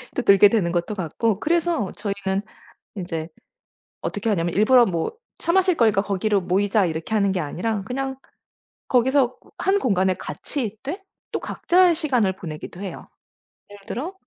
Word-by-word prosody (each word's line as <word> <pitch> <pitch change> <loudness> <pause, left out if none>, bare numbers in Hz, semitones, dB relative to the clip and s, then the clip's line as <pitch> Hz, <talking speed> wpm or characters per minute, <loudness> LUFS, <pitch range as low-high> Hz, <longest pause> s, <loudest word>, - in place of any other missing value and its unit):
또 - - 0
들게 200 -2 +7
되는 200 -5 +1
것도 175 +4 -1
같고 200 +4 -1
그래서 335 - +1
저희는 200 -1 -2 0.6
인제 165 -4 -4 0.7
어떻게 205 +1 -3
하냐면 175 -5 0
일부러 240 +4 +6
뭐 170 - -2 0.3
"차 - - -2
마실 370 -1 +4
거니까 215 -6 +3
거기로 200 0 0
모이자." 195 +2 +2
이렇게 160 +5 -4
하는 200 -2 +2
게 185 - -1
아니라 195 +7 -2
그냥 265 +6 -3 0.7
거기서 255 0 +2 0.2
1 395 +1 +2
공간에 190 - +2
같이 250 - -4
있되 270 - -6 0.3
또 - - -2
각자의 355 -1 +3
시간을 245 - +1
보내기도 170 0 -8
해요. 195 - -7 0.6
예를 205 0 -12
들어 310 +11 -4
205 Hz, 325 characters per minute, -23 LUFS, 190-255 Hz, 0.7 s, 들게